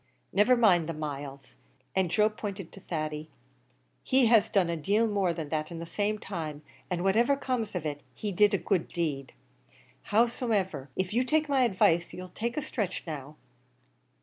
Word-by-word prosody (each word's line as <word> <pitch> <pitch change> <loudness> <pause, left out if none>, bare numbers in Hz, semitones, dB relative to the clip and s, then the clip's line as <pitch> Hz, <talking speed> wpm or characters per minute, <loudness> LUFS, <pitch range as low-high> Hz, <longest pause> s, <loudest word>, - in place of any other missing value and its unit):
"Niver 210 +6 +5
mind 180 -8 +4
the - - -1
miles; 140 -2 -5
he" 130 - -24 0.4
and 190 -2 +2
Joe 210 +4 +4
pointed 200 -4 -6
to - - -12
Thady 155 -3 -4 0.7
"he 260 -1 +3
has 225 -3 +5
done 190 -4 +3
a 170 - -1
deal 205 +8 +2
more 200 -4 +1
than 160 -3 -5
that 155 0 -2
in 170 - -7
the 165 - -5
same 205 +5 -1
time 155 -7 -6 0.3
an' 180 -1 -1
whatever 235 +8 +3
comes 245 -7 -2
of 170 -3 -3
it, 145 -1 -3
he 210 - -3
did 205 +2 +4
a - - +2
good 190 -5 0
deed. 145 -6 -3 0.7
Howsomever, 210 - +1
if 185 +1 -2
you'll 250 +2 +1
take 310 +1 +2
my 275 -2 +2
advice, 175 -5 +2
you'll 185 0 -7
take 235 +6 -4
a 300 - 0
stretch 200 -9 -3
now. 150 -3 -6
185 Hz, 180 wpm, -29 LUFS, 160-220 Hz, 0.7 s, Niver